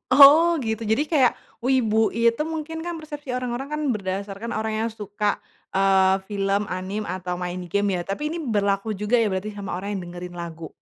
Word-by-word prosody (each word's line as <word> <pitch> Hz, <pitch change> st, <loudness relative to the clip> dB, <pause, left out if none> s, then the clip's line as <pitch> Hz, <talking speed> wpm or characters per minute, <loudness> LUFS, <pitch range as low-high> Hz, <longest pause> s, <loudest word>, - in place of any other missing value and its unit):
Oh 305 Hz, +5 st, +8 dB
gitu. 220 Hz, 0 st, -2 dB
Jadi 220 Hz, +7 st, +1 dB
kayak, 270 Hz, -7 st, +4 dB, 0.3 s
wibu 225 Hz, -4 st, +3 dB
itu 230 Hz, +4 st, +2 dB
mungkin 320 Hz, 0 st, -4 dB
kan 345 Hz, -1 st, -4 dB
persepsi 295 Hz, -3 st, -8 dB
orang-orang 250 Hz, +1 st, -3 dB
kan 300 Hz, 0 st, -2 dB
berdasarkan 200 Hz, +3 st, -4 dB
orang 220 Hz, 0 st, -1 dB
yang 230 Hz, -, -1 dB
suka, 210 Hz, -1 st, -2 dB, 0.3 s
eee, 190 Hz, 0 st, +4 dB
film, 200 Hz, 0 st, 0 dB
anime, 190 Hz, +3 st, -3 dB
atau 180 Hz, 0 st, -3 dB
main 180 Hz, 0 st, -4 dB
game 200 Hz, +1 st, +1 dB
ya -, -, -2 dB
tapi 295 Hz, +10 st, -2 dB
ini 340 Hz, -, -4 dB
berlaku 205 Hz, -4 st, 0 dB
juga 210 Hz, +4 st, -1 dB
ya 225 Hz, -3 st, +2 dB
berarti 195 Hz, +3 st, -3 dB
sama 195 Hz, -3 st, -4 dB
orang 200 Hz, +2 st, -4 dB
yang 175 Hz, -2 st, -6 dB
dengerin 175 Hz, 0 st, -8 dB
lagu. 165 Hz, -2 st, -7 dB
210 Hz, 180 wpm, -24 LUFS, 195-255 Hz, 0.3 s, Oh